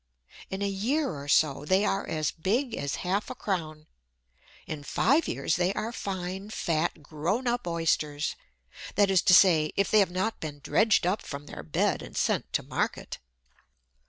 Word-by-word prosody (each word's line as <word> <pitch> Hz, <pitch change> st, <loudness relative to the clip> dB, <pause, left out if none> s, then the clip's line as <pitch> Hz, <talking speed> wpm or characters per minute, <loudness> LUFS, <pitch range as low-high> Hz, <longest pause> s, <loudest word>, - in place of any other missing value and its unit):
In 190 Hz, +1 st, -3 dB
a -, -, +1 dB
year 235 Hz, +10 st, 0 dB
or 140 Hz, -3 st, -7 dB
so 145 Hz, -1 st, +3 dB
they 190 Hz, +7 st, +2 dB
are 195 Hz, 0 st, -1 dB
as 155 Hz, -2 st, -1 dB
big 230 Hz, -, -1 dB
as 140 Hz, 0 st, -2 dB
half 195 Hz, +4 st, 0 dB
a 255 Hz, -, -5 dB
crown. 160 Hz, -9 st, -3 dB, 0.8 s
In 155 Hz, -2 st, -5 dB
five 280 Hz, -, +2 dB
years 160 Hz, -, 0 dB
they 180 Hz, +1 st, +2 dB
are 225 Hz, -, -2 dB
fine, 190 Hz, -2 st, -5 dB
fat 165 Hz, -5 st, -1 dB
grown 165 Hz, -, -2 dB
up 240 Hz, -4 st, -1 dB
Oysters 155 Hz, -3 st, 0 dB, 0.6 s
that 200 Hz, -1 st, +4 dB
is 185 Hz, -2 st, +4 dB
to 185 Hz, -3 st, +6 dB
say, 160 Hz, -6 st, +5 dB
if 200 Hz, -, +1 dB
they 215 Hz, -, +6 dB
have 195 Hz, -, +4 dB
not 190 Hz, +5 st, -2 dB
been 150 Hz, -2 st, -6 dB
dredged 220 Hz, -4 st, +3 dB
up 185 Hz, +4 st, +1 dB
from 140 Hz, 0 st, -7 dB
their 110 Hz, -, -8 dB
bed 75 Hz, 0 st, 0 dB
and -, -, -9 dB
sent -, -, 0 dB
to -, -, +1 dB
market. -, -, -3 dB
185 Hz, 175 wpm, -28 LUFS, 155-205 Hz, 0.8 s, to